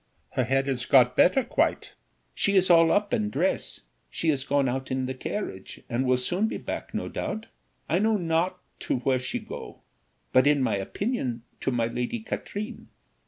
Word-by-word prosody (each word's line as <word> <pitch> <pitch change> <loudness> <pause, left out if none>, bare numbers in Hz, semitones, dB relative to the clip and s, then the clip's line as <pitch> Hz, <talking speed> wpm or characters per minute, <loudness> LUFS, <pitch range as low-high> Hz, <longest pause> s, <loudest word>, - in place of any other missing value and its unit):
Her 130 - 0
head 135 +3 +1
is 125 -2 -1
got 125 -2 +5
better 255 +9 +5
quite. 240 - 0 0.4
She 200 - +1
is 185 -1 +5
all 165 -1 +6
up 205 0 +1
and 105 -1 0
dress; - - -1 0.3
she 165 - 0
is 135 -3 -1
gone 140 -1 +1
out 130 +1 -2
in 130 0 -1
the 130 - -3
carriage, 130 - -5
and 125 +2 -1
will 125 0 +4
soon 180 - 0
be - - -3
back - - -6
no - - -2
doubt. 220 +1 -4 0.4
I 170 - +2
know 220 +1 +3
not 175 +1 0 0.2
to - - -1
where 130 0 +2
she 125 0 -3
go, - - -8 0.5
but 130 +2 +5
in 145 -2 +4
my - - +1
opinion 120 - -2 0.2
to - - -1
my 120 -3 +1
Lady 125 - -2
Katrine. 215 +1 -5
135 Hz, 185 wpm, -27 LUFS, 125-185 Hz, 0.5 s, all